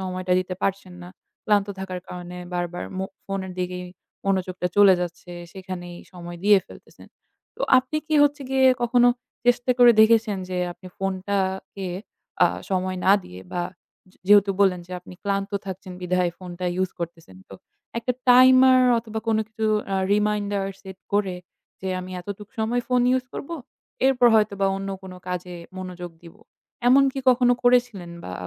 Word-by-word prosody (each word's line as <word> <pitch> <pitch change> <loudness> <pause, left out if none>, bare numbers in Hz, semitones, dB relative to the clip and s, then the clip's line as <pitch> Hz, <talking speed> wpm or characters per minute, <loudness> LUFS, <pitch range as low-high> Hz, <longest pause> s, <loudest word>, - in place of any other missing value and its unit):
সময়টা 185 -1 -2
দিতে 185 0 -5
পারছেন 195 -2 -2
না। 175 - -9 0.4
ক্লান্ত 205 -1 +3
থাকার 185 -1 -5
কারণে 180 0 -8 0.2
বারবার 175 0 -3
মো 190 - -1 0.2
ফোনের 195 -1 -4
দিকেই 180 0 -3 0.4
মনোযোগটা 185 -2 -1
চলে 200 -2 +7
যাচ্ছে, 175 0 -6 0.2
সেখানেই 180 -2 -7 0.2
সময় 175 -1 -8
দিয়ে 205 -1 +7
ফেলতেছেন। - - -16 0.5
তো - - -5 0.2
আপনি 260 +4 -3
কি 315 - -1
হচ্ছে 290 -1 +2
গিয়ে 265 0 +4 0.2
কখনো 245 +1 +4 0.4
চেষ্টা 245 +1 +3
করে 240 -1 +8
দেখেছেন 220 -2 +4
যে 185 - -4 0.2
আপনি 185 +1 -15
ফোনটাকে 190 0 -2 0.6
আ - - +6 0.2
সময় 185 0 -1
না 195 - +7
দিয়ে 90 +1 -11
বা 175 - -1 0.5
যে - - -28
যেহেতু 205 -1 +6
বললেন 185 -3 +3
যে 185 - -10
আপনি 180 0 -13
ক্লান্ত 200 0 -1 0.2
থাকছেন 190 -1 -7
বিধায় 180 -1 +1
ফোনটা 180 -1 -7 0.2
use 185 - -2
করতেছেন 165 - -7
তো, 95 - -10 0.4
একটা 250 +2 -1 0.2
timer 255 +1 +7 0.2
অথবা 220 -1 -5
কোনো 220 -1 +2
কিছু 220 0 -3 0.3
আ - - +1 0.2
reminder 205 -1 0 0.2
set 190 -1 -10
করে 195 -3 +1 0.4
যে 190 - -4
আমি 185 0 -8
এতটুক 205 +2 -8
সময় 235 +3 0
phone 250 -1 +3
use 255 - -4
করব, 280 - -7 0.6
এরপর 250 -2 +4
হয়তোবা 200 -2 +2
অন্য 195 0 -5
কোনো 185 -1 -9
কাজে 180 0 -4 0.2
মনোযোগ 180 -2 -7
দিব। 170 +2 -13 0.5
এমন 270 +2 +7
কি 270 - -5
কখনো 245 -1 +5
করেছিলেন 245 -8 +2
বা - - -6
195 Hz, 160 wpm, -24 LUFS, 180-220 Hz, 0.6 s, করে